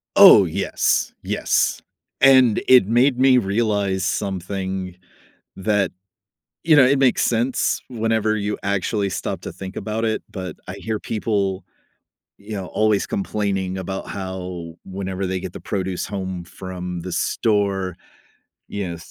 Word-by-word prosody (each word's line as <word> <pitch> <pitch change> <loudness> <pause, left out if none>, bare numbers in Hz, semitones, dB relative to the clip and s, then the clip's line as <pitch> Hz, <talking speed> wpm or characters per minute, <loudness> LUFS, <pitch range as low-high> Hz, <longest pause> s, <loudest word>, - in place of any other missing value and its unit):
Oh, - - +9
yes. - - 0
Yes. - - 0 0.4
And 130 -5 +6
it 125 -7 +7
made 125 +3 +3
me 130 -1 +6
realize 100 -3 0
something 95 -1 -3 0.6
that 100 -1 +1 0.7
you 160 -1 +5
know, 145 - +8
it 135 +1 +3
makes 130 -3 +3
sense 120 +3 +1
whenever 110 -2 0
you 105 0 -2
actually 100 +1 -1
stop - - -4
to - - -6
think 95 +1 -8
about 110 +1 -2
it. 110 - -1
But 95 -4 -6
I - - -5
hear 110 -1 -3
people, 100 -3 -1 0.7
you 100 +2 -13
know, 100 -3 -3
always 110 -2 +1
complaining 100 - -2
about 95 +1 -5
how 90 -3 -6
whenever 95 0 -4
they 95 0 -2
get - - -7
the - - -9
produce 95 -2 -3
home 95 -3 -4
from 90 0 -6
the 90 +1 -5
store, 100 -4 0 0.7
you 100 -3 -4
know, 85 - -5
100 Hz, 140 wpm, -22 LUFS, 95-110 Hz, 0.7 s, Oh